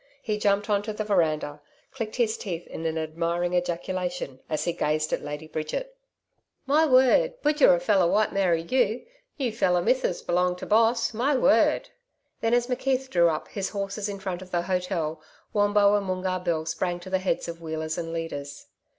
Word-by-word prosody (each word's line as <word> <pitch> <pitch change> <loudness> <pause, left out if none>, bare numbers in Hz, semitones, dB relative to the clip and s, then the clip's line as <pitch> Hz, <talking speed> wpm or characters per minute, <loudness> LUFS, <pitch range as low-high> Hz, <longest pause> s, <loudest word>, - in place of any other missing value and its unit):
He 215 -2 -2
jumped 205 0 +2
on 205 -2 +2
to 215 +1 -5
the 215 - -3
veranda, 155 -7 0 0.3
clicked 225 -5 -5
his 230 -3 +1
teeth 175 -4 -5
in 165 - -5
an 160 0 -2
admiring 170 +2 -1
ejaculation 180 -4 -2
as 155 - -1
he 175 - -1
gazed 155 0 0
at - - 0
Lady 150 +1 -6
Bridget. 155 - -4 0.7
'My 305 +3 +4
word! 300 - +4
BUJERI 295 - +5
feller 185 0 +3
White 215 0 +2
Mary 175 -4 +2
you!... 235 +3 0 0.3
new 260 -5 -1
feller 185 -5 +2
Mithsis 235 -1 0
belonging 180 +1 +1
to - - -7
Boss. 230 +2 +3
My 260 +6 +1
word!' 250 - +3 0.5
Then 225 +1 +2
as 245 0 +2
McKeith 260 +1 -1
drew 170 -1 +4
up 155 -1 -3
his 195 -2 -3
horses 200 0 -3
in 200 - -4
front 190 -2 -4
of 185 - -10
the 175 -1 0
hotel, 180 -4 -2 0.3
Wombo 205 -1 +4
and 205 -2 +1
Moongarr 185 0 -2
Bill 160 -3 -1
sprang 175 +2 -2
to 185 +1 -10
the 190 - +2
heads 185 -1 -1
of 170 0 -7
wheelers 160 -1 -3
and 165 -1 -4
leaders. 145 -4 -5
185 Hz, 185 wpm, -26 LUFS, 170-215 Hz, 0.7 s, BUJERI